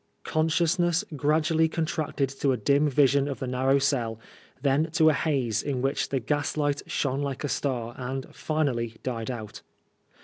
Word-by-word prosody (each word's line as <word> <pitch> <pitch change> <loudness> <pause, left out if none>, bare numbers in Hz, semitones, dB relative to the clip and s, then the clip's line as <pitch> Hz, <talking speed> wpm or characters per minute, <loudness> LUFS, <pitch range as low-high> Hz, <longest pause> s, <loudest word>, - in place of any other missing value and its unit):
Consciousness 170 +3 +1
gradually 155 +3 +2
contracted 155 -3 -1
to 135 0 0
a 130 - +1
dim 140 +7 +3
vision 140 0 +3
of 140 - -3
the - - -4
narrow 130 +2 +2
cell, 125 -5 0 0.4
then 145 +3 +2
to 160 -1 +5
a - - +3
haze, 135 -7 0
in 135 -3 -2
which 135 +1 0
the 135 - 0
gaslight 145 +2 -1
shone 140 0 -1
like 140 -1 -3
a - - 0
star, 125 -5 -2
and 130 +1 -4
finally 125 -8 -1
died 115 -3 -3
out. 110 -4 -6
140 Hz, 160 wpm, -27 LUFS, 130-155 Hz, 0.4 s, to